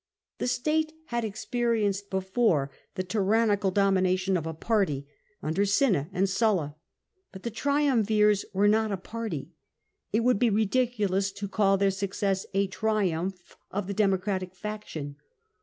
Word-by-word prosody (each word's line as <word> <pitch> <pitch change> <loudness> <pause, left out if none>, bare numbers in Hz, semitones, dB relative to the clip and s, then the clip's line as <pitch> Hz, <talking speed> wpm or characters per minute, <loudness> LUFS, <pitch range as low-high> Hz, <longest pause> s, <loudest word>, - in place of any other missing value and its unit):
The - - -1
state 310 +5 0 0.2
had 235 -1 -1
experienced 215 -2 -1
before 190 - +1 0.2
the 185 - -1
tyrannical 205 +1 +2
domination 190 -1 +2
of 165 -3 -1
a 160 - -3
party, 160 -8 0 0.4
under 160 +6 +1
Cinna 200 - +2
and 195 +1 +1
Sulla; 190 -7 +1 0.6
but 190 - -11
the 235 - -3
triumvirs 220 -6 +2
were 200 +1 +3
not 215 +1 +3
a 195 - -1
party: 210 -5 -5 0.6
it 220 - +2
would 245 -3 +3
be 240 - +4
ridiculous 210 -3 +1
to 200 0 -5
call 195 -1 +2
their 195 0 +3
success 195 0 -2
a 200 0 +3
triumph 190 -3 -2
of 205 0 -3
the 200 - -3
Democratic 190 -2 0
faction. 180 -8 -6
200 Hz, 140 wpm, -27 LUFS, 190-220 Hz, 0.6 s, be